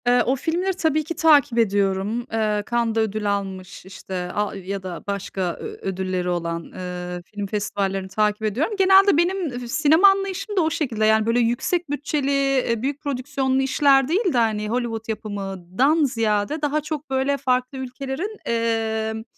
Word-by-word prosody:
Eee, 245 0 +5
o 260 - +2
filmleri 345 +7 -1
tabii 315 -4 +1
ki 330 +3 -5
takip 290 -6 +4
ediyorum. 205 +1 +1
Eee, 215 -2 0
Cannes'da 230 -1 +1
ödül 215 -1 0
almış, 190 -2 -7
işte, 190 0 -10 0.2
a 210 -1 -1
ya 195 0 -5
da 180 -2 -6
başka 200 -1 -4 0.2
ö - - -7
ödülleri 185 -1 -2
olan, 170 -1 -2
eee, 180 -1 -6
film 205 0 -6
festivallerini 195 -2 -2
takip 210 +2 0
ediyorum. 245 - 0
Genelde 385 -2 +6
benim 345 -7 0
fi 245 - -7
sinema 315 +7 +5
anlayışım 390 +1 0
da - - +5
o 320 - +2
şekilde. 255 -10 -1
Yani, 220 0 +4
böyle, 230 +2 +2
yüksek 275 +9 0
bütçeli, 290 -1 -1
eee, 275 -5 +1
büyük 280 +3 -2
prodüksiyonlu 265 -1 -1
işler 270 0 +4
değil 370 +3 +1
de, - - +1
hani, 215 -2 +1
Hollywood 230 -2 -2
yapımından 205 - -1
ziyade 225 +2 0
daha 300 +1 0
çok, 300 -1 -5
böyle, 270 +1 +1
farklı 255 -1 -1
ülkelerin, 270 - -5
emm, 220 -1 -1
240 Hz, 160 wpm, -23 LUFS, 205-290 Hz, 0.2 s, Genelde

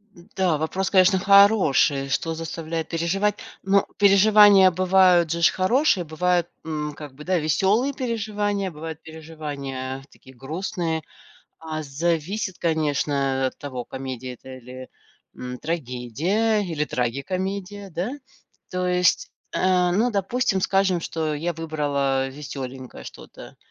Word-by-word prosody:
М, 175 +4 -18
да, 180 -5 +2
вопрос, 170 +5 -2
конечно, 190 0 +4
хороший, 190 -9 +4
что 165 +4 -1
заставляет 160 0 -4
переживать, 190 +5 0 0.3
но 195 0 +3
переживания 200 -1 +7
бывают 180 -2 +4
же 170 0 -2
ж 170 - +6
хорошие, 195 - +2
бывают, 175 +2 0 0.2
м, 150 -2 -4
как 145 -2 -10
бы, 145 +3 -11
да, 185 +3 +1
веселые 195 - +1
переживания, 210 -6 -2
бывают 160 0 -8
переживания, 145 -5 -6
э, 135 - -15
такие 130 -1 -17
грустные, 160 - -3 0.6
а, 155 -1 -5
зависит 170 +6 -2
конечно, 155 -3 0 0.3
э, - - +3
от 130 - -6
того 130 -4 -6
комедия 130 -1 -6
это 130 +2 -11
или, 130 +1 -10 0.5
м, 125 0 -7
трагедия 165 - -1
или 165 -6 -2
трагикомедия, 190 - -3
да? 180 +6 -3 0.6
То 185 0 -2
есть, 180 0 +2 0.2
э, 180 -1 +2
ну 220 +7 +2
допустим 205 0 0
скажем, 190 -2 +2
что 160 -2 -2
я 165 +4 -2
выбрала, 145 -4 -1
э, - - -10
веселенькое 130 - -8
что-то - - -12
165 Hz, 130 wpm, -23 LUFS, 145-190 Hz, 0.6 s, переживания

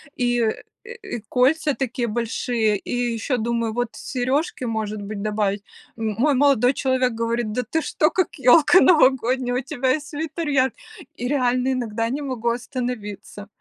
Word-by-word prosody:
и, 245 -1 +1
э, 220 -1 -1 0.2
э, 475 - -9
и 385 -11 -5
кольца 280 +3 +2
такие 250 -2 -2
большие, 225 -1 0
и 245 +3 -2
еще 235 +3 -1
думаю 230 -1 -1
вот 245 0 -1
сережки, 260 +3 -2
может 215 -2 -3
быть, 200 0 -6
добавить. 210 -1 -1 0.3
М 220 -2 -2
мой 285 +5 +3
молодой 270 -2 +4
человек 260 -2 +1
говорит: 230 0 -2
"Да 250 - 0
ты 320 +8 -1
что, 305 +2 +1
как 370 - -1
ёлка 290 +7 +6
новогодняя, 260 -5 +3
у - - -3
тебя 260 0 -1
и 310 - -3
свитер 310 +2 -5
яркий!" 265 -4 +1 0.4
И 245 - -4
реально 255 -1 +1
иногда 230 -2 -2
не 285 +4 -3
могу 245 -4 -2
остановиться. 235 -5 -5
245 Hz, 165 wpm, -22 LUFS, 225-270 Hz, 0.4 s, ёлка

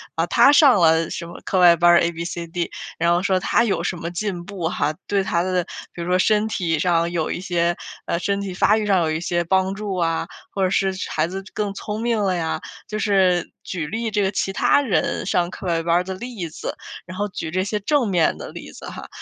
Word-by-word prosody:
呃， 165 - +1
他 275 - +6
上 280 - +6
了 160 0 +4
什 170 - -5
么 170 - -10
课 190 - +1
外 175 -1 +7
班 175 +1 +5
儿 170 - +6
，abcd。 170 0 -3 0.3
然 170 +1 +2
后 175 - +2
说 190 -2 +2
他 195 - +2
有 220 -4 0
什 - - -1
么 170 0 -4
进 180 -1 -3
步 185 -3 -4
哈， 155 -3 -1
对 200 -1 +1
他 170 -2 0
的 185 -1 0 0.3
比 170 - -7
如 170 - -4
说 180 - +3
身 210 +2 +3
体 170 -6 0
上 170 0 +2
有 165 -3 -1
一 - - -3
些， 175 -1 0 0.3
呃， - - -1
身 200 +2 -1
体 195 -2 -4
发 210 +4 +3
育 215 - -1
上 195 -3 +3
有 160 -1 0
一 155 - -2
些 175 0 0
帮 190 +2 +2
助 200 -1 -4
啊， 165 -2 0 0.2
或 195 - -3
者 185 - +3
是 195 0 +1 0.2
孩 155 - +1
子 190 +2 -5
更 205 -2 -2
聪 210 +2 -5
明 230 -1 +1
了 190 -2 +1
呀。 165 -2 -2 0.3
就 215 - -4
是 190 -4 +2
举 165 -5 -4
例 225 +5 -3
这 210 - +1
个 195 -1 +1
其 195 - -1
他 240 - +3
人 235 -9 0
上 175 -2 +1
课 185 - -7
外 165 -1 +1
班 170 0 +2
儿 175 - +3
的 190 +1 -5
例 200 -5 -6
子。 - - -6 0.3
然 185 +1 -9
后 205 +1 0
举 165 -4 -5
这 185 +2 0
些 210 +2 -2
正 265 +4 +1
面 175 -4 +2
的 - - -7
例 - - -9
子 - - -11
哈， - - -8
185 Hz, 270 characters per minute, -22 LUFS, 170-200 Hz, 0.3 s, 外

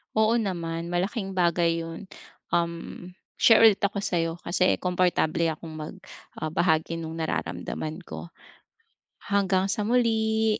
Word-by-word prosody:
Oo 220 +2 +3
naman, 170 -5 -3
malaking 190 +2 -2
bagay 170 -1 +2
'yon. 165 +4 -8 0.5
Um, 170 +1 -2 0.2
share 225 - +6
ulit 215 -3 +5
ako 200 0 +1
sa'yo 165 -3 -1
kasi 180 +2 +1
komportable 180 -3 +1
akong 160 0 -8
mag, 155 +4 -7 0.4
ah, 155 - -2
bahagi 160 0 +1
no'ng 165 0 -5
nararamdaman 155 0 -3
ko. 170 - -8 0.9
Hanggang 195 -1 +1
sa 210 +1 -1
muli, 220 -2 +2
180 Hz, 125 wpm, -26 LUFS, 165-200 Hz, 0.9 s, share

